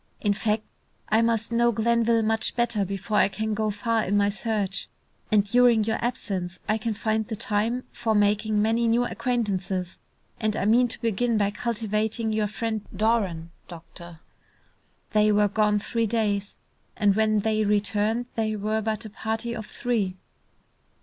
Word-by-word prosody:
"In 205 Hz, -2 st, +1 dB
fact, 215 Hz, +1 st, 0 dB, 0.5 s
I 220 Hz, +1 st, +4 dB
must 230 Hz, -1 st, 0 dB
know 235 Hz, 0 st, +3 dB
Glenville 230 Hz, 0 st, +2 dB
much 220 Hz, 0 st, 0 dB
better 235 Hz, -4 st, +1 dB
before 195 Hz, +2 st, -2 dB
I -, -, +5 dB
can 215 Hz, +2 st, -3 dB
go 215 Hz, 0 st, 0 dB
far 220 Hz, +2 st, 0 dB
in 205 Hz, +2 st, +1 dB
my 200 Hz, 0 st, +3 dB
search, 205 Hz, -2 st, -3 dB, 0.4 s
and 210 Hz, -1 st, +5 dB
during 240 Hz, 0 st, +4 dB
your 220 Hz, +2 st, -2 dB
absence 190 Hz, -8 st, -3 dB
I 215 Hz, +1 st, +1 dB
can 220 Hz, 0 st, -2 dB
find 220 Hz, 0 st, -1 dB
the 220 Hz, -, -3 dB
time 225 Hz, +3 st, -1 dB
for 225 Hz, -2 st, -1 dB
making 210 Hz, +1 st, +2 dB
many 230 Hz, +2 st, +2 dB
new 235 Hz, +2 st, +3 dB
acquaintances, 195 Hz, -8 st, -2 dB, 0.4 s
and 215 Hz, -2 st, 0 dB
I 195 Hz, -, -1 dB
mean 240 Hz, +4 st, +4 dB
to 240 Hz, -, -9 dB
begin 230 Hz, 0 st, +1 dB
by 205 Hz, -1 st, +1 dB
cultivating 220 Hz, 0 st, -2 dB
your 215 Hz, -1 st, +1 dB
friend 220 Hz, +1 st, -3 dB
Doran, 190 Hz, -6 st, 0 dB, 0.2 s
doctor." 170 Hz, 0 st, -11 dB, 0.9 s
They 215 Hz, 0 st, +4 dB
were 210 Hz, 0 st, +4 dB
gone 210 Hz, 0 st, +2 dB
three 230 Hz, +2 st, -1 dB
days, 205 Hz, -2 st, -1 dB, 0.4 s
and 205 Hz, -2 st, +3 dB
when 215 Hz, -1 st, +2 dB
they 215 Hz, 0 st, +1 dB
returned 210 Hz, +3 st, +1 dB
they 220 Hz, -1 st, -1 dB
were 215 Hz, +1 st, -1 dB
but 220 Hz, +1 st, -2 dB
a -, -, -6 dB
party 225 Hz, +2 st, -3 dB
of 220 Hz, -2 st, -6 dB
three. 210 Hz, -7 st, -2 dB
215 Hz, 165 wpm, -25 LUFS, 205-230 Hz, 0.9 s, I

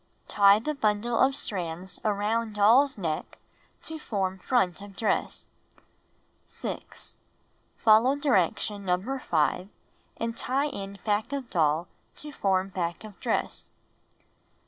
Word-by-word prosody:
Tie 200 Hz, -1 st, +6 dB
the 270 Hz, +8 st, -2 dB
bundle 225 Hz, -2 st, 0 dB
of 265 Hz, +1 st, +4 dB
strands 180 Hz, -5 st, -4 dB
around 215 Hz, +1 st, 0 dB
doll's 240 Hz, +7 st, +5 dB
neck 160 Hz, -5 st, -3 dB, 0.5 s
to 320 Hz, 0 st, -6 dB
form 190 Hz, -8 st, -2 dB
front 195 Hz, -4 st, +1 dB
of 200 Hz, -1 st, -11 dB
dress. 220 Hz, -, -1 dB, 1.0 s
6. -, -, -7 dB, 0.6 s
Follow 225 Hz, +5 st, +5 dB
dh'ection 210 Hz, -, +1 dB
No. 195 Hz, +8 st, -1 dB
5 175 Hz, -1 st, 0 dB, 0.5 s
and 230 Hz, 0 st, -2 dB
tie 275 Hz, +5 st, 0 dB
in 200 Hz, -4 st, -7 dB
back 210 Hz, +3 st, 0 dB
of 275 Hz, -4 st, -4 dB
doll 160 Hz, 0 st, +2 dB, 0.3 s
to 300 Hz, -, -7 dB
form 195 Hz, -6 st, +1 dB
back 175 Hz, -1 st, -3 dB
of 210 Hz, -3 st, -11 dB
dress. -, -, -2 dB
205 Hz, 120 wpm, -27 LUFS, 190-240 Hz, 1.0 s, Tie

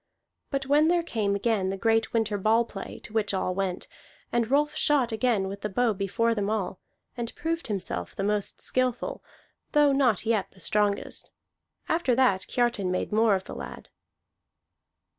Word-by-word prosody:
But 275 Hz, -1 st, -2 dB
when 295 Hz, +3 st, +4 dB
there 345 Hz, 0 st, +3 dB
came 210 Hz, -10 st, -1 dB
again 200 Hz, -2 st, +1 dB
the 195 Hz, -, -3 dB
great 225 Hz, +2 st, +2 dB
winter 220 Hz, -3 st, 0 dB
ball 225 Hz, +4 st, +3 dB
play, 195 Hz, -4 st, -8 dB
to -, -, -11 dB
which 210 Hz, -3 st, +1 dB
all 185 Hz, -1 st, 0 dB
went, 185 Hz, -1 st, -2 dB, 0.4 s
and 235 Hz, -1 st, +1 dB
Rolf 295 Hz, +2 st, +2 dB
shot 275 Hz, -5 st, +2 dB
again 220 Hz, -3 st, +1 dB
with 200 Hz, +1 st, -6 dB
the 210 Hz, -, -2 dB
bow 230 Hz, +3 st, +2 dB
before 205 Hz, +4 st, 0 dB
them 205 Hz, -2 st, -1 dB
all, 210 Hz, -4 st, -2 dB, 0.4 s
and 235 Hz, -2 st, -4 dB
proved 330 Hz, +1 st, -2 dB
himself 185 Hz, -, -3 dB
the 195 Hz, -, -3 dB
most 205 Hz, 0 st, 0 dB
skilful, 255 Hz, -1 st, -1 dB, 0.5 s
though 295 Hz, -1 st, +5 dB
not 260 Hz, -6 st, +2 dB
yet 220 Hz, -4 st, 0 dB
the 190 Hz, -, -19 dB
strongest: 205 Hz, +1 st, -1 dB, 0.6 s
after 320 Hz, -7 st, +2 dB
that 230 Hz, -8 st, +2 dB
Kiartan 235 Hz, -6 st, 0 dB
made 185 Hz, -, -2 dB
more 215 Hz, -1 st, +4 dB
of 190 Hz, -, -3 dB
the -, -, -9 dB
lad. -, -, -8 dB
220 Hz, 170 wpm, -27 LUFS, 200-250 Hz, 0.6 s, though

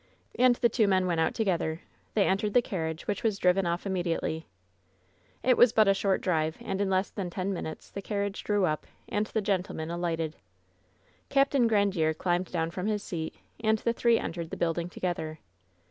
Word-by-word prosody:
And 250 Hz, -1 st, +4 dB
the 240 Hz, -, +3 dB
two 225 Hz, -2 st, +2 dB
men 190 Hz, -1 st, +3 dB
went 170 Hz, -2 st, 0 dB
out 160 Hz, -, +1 dB
together. 170 Hz, -6 st, 0 dB, 0.3 s
They 205 Hz, -, +4 dB
entered 200 Hz, +2 st, 0 dB
the 245 Hz, -, +7 dB
carriage, 160 Hz, -5 st, -3 dB
which 205 Hz, -2 st, -2 dB
was 215 Hz, -3 st, +1 dB
driven 180 Hz, 0 st, +3 dB
off 170 Hz, +2 st, -2 dB
immediately. 175 Hz, -4 st, -2 dB, 1.0 s
It 255 Hz, -1 st, +4 dB
was 245 Hz, -2 st, +6 dB
but 215 Hz, -2 st, +5 dB
a 195 Hz, -, +6 dB
short 195 Hz, 0 st, +1 dB
drive, 160 Hz, -3 st, 0 dB
and 195 Hz, +1 st, -3 dB
in 200 Hz, -, +1 dB
less 190 Hz, +1 st, +1 dB
than 190 Hz, -4 st, -4 dB
ten 185 Hz, +2 st, -2 dB
minutes 160 Hz, -3 st, -6 dB
the 200 Hz, -, -5 dB
carriage 200 Hz, 0 st, -3 dB
drew 205 Hz, -2 st, +2 dB
up, 155 Hz, -3 st, -2 dB, 0.2 s
and 210 Hz, +1 st, 0 dB
the 220 Hz, -, -1 dB
gentlemen 180 Hz, -5 st, -2 dB
alighted. 165 Hz, -2 st, -2 dB, 0.9 s
Capt. 275 Hz, 0 st, +3 dB
Grandiere 200 Hz, -, +3 dB
climbed 175 Hz, 0 st, 0 dB
down 165 Hz, -2 st, -1 dB
from 185 Hz, +3 st, -3 dB
his 210 Hz, -1 st, -1 dB
seat, 160 Hz, -3 st, -4 dB, 0.3 s
and 220 Hz, 0 st, +3 dB
the 230 Hz, +2 st, 0 dB
three 235 Hz, 0 st, +3 dB
entered 170 Hz, -4 st, -4 dB
the -, -, -5 dB
building 170 Hz, +1 st, -1 dB
together. 165 Hz, -3 st, -3 dB
190 Hz, 190 wpm, -29 LUFS, 170-210 Hz, 1.0 s, the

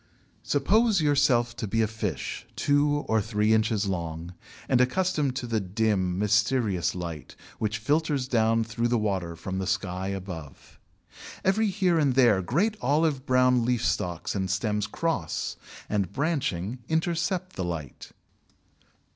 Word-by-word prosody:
Suppose 210 Hz, +8 st, +2 dB
yourself 130 Hz, -6 st, +2 dB
to 110 Hz, -, -3 dB
be 115 Hz, +3 st, +1 dB
a -, -, +1 dB
fish 110 Hz, +1 st, -4 dB
two 145 Hz, 0 st, +2 dB
or 110 Hz, -1 st, +2 dB
three 105 Hz, +1 st, +1 dB
inches 110 Hz, -1 st, +2 dB
long, 85 Hz, -2 st, -4 dB, 0.3 s
and 125 Hz, -2 st, +3 dB
accustomed 150 Hz, -1 st, +1 dB
to 130 Hz, -, -3 dB
the 115 Hz, -2 st, 0 dB
dim, 95 Hz, -2 st, 0 dB
mysterious 105 Hz, -2 st, +1 dB
light 85 Hz, -4 st, -6 dB, 0.2 s
which 110 Hz, 0 st, -1 dB
filters 145 Hz, +3 st, 0 dB
down 115 Hz, -2 st, +2 dB
through 115 Hz, +1 st, -1 dB
the 120 Hz, 0 st, +1 dB
water 95 Hz, -6 st, -1 dB
from 95 Hz, +3 st, -4 dB
the 95 Hz, -, -3 dB
sky 95 Hz, 0 st, -2 dB
above. 90 Hz, -7 st, -7 dB, 0.7 s
Every 210 Hz, +3 st, +3 dB
here 185 Hz, -4 st, +2 dB
and 140 Hz, -4 st, +2 dB
there 120 Hz, -7 st, +5 dB
great 185 Hz, -, 0 dB
olive 145 Hz, -2 st, +1 dB
brown 125 Hz, -1 st, +4 dB
leaf 120 Hz, 0 st, 0 dB
stalks 85 Hz, -2 st, -1 dB
and 95 Hz, -2 st, -2 dB
stems 105 Hz, +2 st, 0 dB
cross 160 Hz, -, -2 dB, 0.3 s
and, 100 Hz, -3 st, -1 dB
branching, 130 Hz, -, -1 dB
intercept 170 Hz, +3 st, -1 dB
the 95 Hz, -, -2 dB
light. 80 Hz, -6 st, -6 dB
115 Hz, 140 wpm, -27 LUFS, 95-145 Hz, 0.7 s, there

